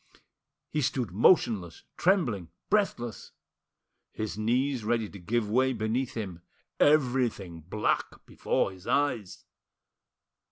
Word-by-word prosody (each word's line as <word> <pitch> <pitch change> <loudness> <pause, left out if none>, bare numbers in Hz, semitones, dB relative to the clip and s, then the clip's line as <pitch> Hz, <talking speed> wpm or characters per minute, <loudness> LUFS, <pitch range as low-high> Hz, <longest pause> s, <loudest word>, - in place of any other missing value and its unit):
He 150 - 0
stood 125 -5 -1
motionless, 100 - +3
trembling, 125 - +1 0.2
breathless; 125 - -1 0.8
his 110 -1 -4
knees 125 +4 0
ready 115 0 0
to 100 - -11
give 110 +5 -1
way 130 +5 +2
beneath 115 +3 -2
him; 95 -7 -5 0.4
everything 125 - +2
black 100 +7 -2
before - - -1
his 95 0 -14
eyes. 130 -9 -1
115 Hz, 105 wpm, -28 LUFS, 100-130 Hz, 0.8 s, motionless